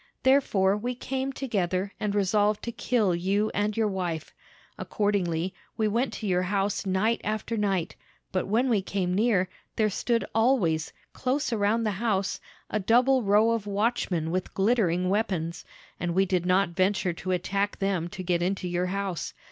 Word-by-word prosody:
Therefore 210 -8 +3
we 245 +4 -3
came 265 +2 -3
together, 200 -7 -2
and 210 -2 -1
resolved 205 +1 +2
to 235 - -3
kill 225 -4 +1
you 195 +5 0
and 205 +1 -1
your 220 -1 +2
wife. 175 -5 -3 0.5
Accordingly, 190 -4 -1 0.2
we 220 - +2
went 235 +5 0
to 220 - -6
your 180 -1 +2
house 195 +1 -1
night 205 +5 +1
after 215 +2 -2
night; 195 -5 -1 0.4
but 185 - -1
when 230 +6 +2
we 220 -6 +2
came 185 -1 -2
near, 200 -2 +2 0.3
there 215 -1 +2
stood 230 +4 0
always, 215 - +2 0.2
close 265 +1 -1
around 220 +2 +1
the 215 - +1
house, 200 -5 0 0.3
a 215 - -1
double 250 +6 +4
row 210 +2 +4
of 225 -3 -1
watchmen 200 -6 0
with 185 +1 -3
glittering 190 -4 +2
weapons, 185 -5 -1 0.3
and 175 -1 -2
we 190 +1 +4
did 180 -2 0
not 185 0 +3
venture 185 +1 +1
to 185 - -7
attack 195 +3 0
them 195 -4 0
to 185 +1 -7
get 175 -1 0
into 185 +1 -1
your 180 +1 -1
house. 195 -2 -3
200 Hz, 165 wpm, -27 LUFS, 185-225 Hz, 0.5 s, double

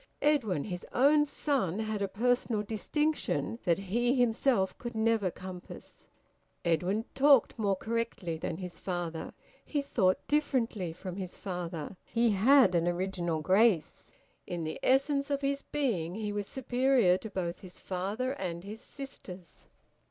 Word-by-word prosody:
Edwin, 230 - +2
his 180 -3 -5
own 295 +3 +5
son, 265 - 0
had 215 -1 -2
a 200 - +1
personal 230 +1 +1
distinction 245 +3 -1
that 170 -3 +3
he 235 +6 +1
himself 240 -4 +2
could 240 -1 -6
never 220 -3 +2
compass. 185 0 -10 0.6
Edwin 180 +6 +1
talked 270 -4 +5
more 200 -2 +2
correctly 225 -5 -2
than 160 0 -4
his 180 -2 -7
father. 175 -3 -4 0.3
He 290 -2 -2
thought 190 -9 +1
differently 240 - 0
from 180 +2 -7
his 185 -2 -6
father. 175 -2 -5
He 230 -1 +1
had 215 +1 +5
an 170 0 +2
original 175 -2 -1
grace. 190 0 +2 0.4
In 175 -2 -3
the 155 - -4
essence 275 +1 +2
of 280 -1 0
his 280 0 0
being 195 - -1
he 210 -1 -3
was 205 -1 -3
superior 255 -6 +3
to 220 - -7
both 175 -3 -3
his 180 -2 -10
father 200 +8 -2
and 180 -10 -4
his 210 +3 -8
sisters. 190 - -10
205 Hz, 145 wpm, -30 LUFS, 180-255 Hz, 0.6 s, own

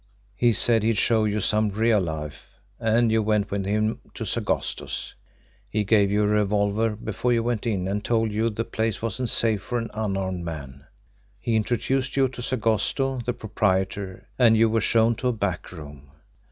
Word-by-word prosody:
He 120 +3 +3
said 115 +1 +3
he'd 110 0 +1
show 110 -1 +3
you 105 0 0
some 105 +2 +2
real 110 +2 +2
life, 80 -4 -6 0.2
and 115 0 +2
you 110 0 +3
went 105 -1 0
with 100 -1 -2
him 110 +2 0 0.2
to - - -5
Sagosto's. - - -2 0.6
He 105 - 0
gave 100 -1 +3
you 105 +1 +2
a - - +2
revolver 105 +1 +1
before 110 +3 -1
you 115 -1 +1
went 120 -1 -2
in, 95 -5 -1
and 100 +2 -2
told 115 -2 +1
you 110 +2 +1
the 115 +1 -3
place 110 -1 -2
wasn't 115 +2 -1
safe 110 -3 +2
for 120 - -3
an 115 -1 -4
unarmed 95 -4 -2
man. 70 -3 -8 0.5
He 115 0 -1
introduced 125 +5 0
you 135 -1 +4
to 125 - -8
Sagosto, 125 +3 0
the 125 - +1
proprietor, 100 -3 -2
and 115 -3 +6
you 115 0 +4
were 115 0 +2
shown 115 +2 +3
to 130 - -1
a 125 - +2
back 100 -5 -3
room. 75 -5 -11
110 Hz, 180 wpm, -24 LUFS, 100-115 Hz, 0.6 s, and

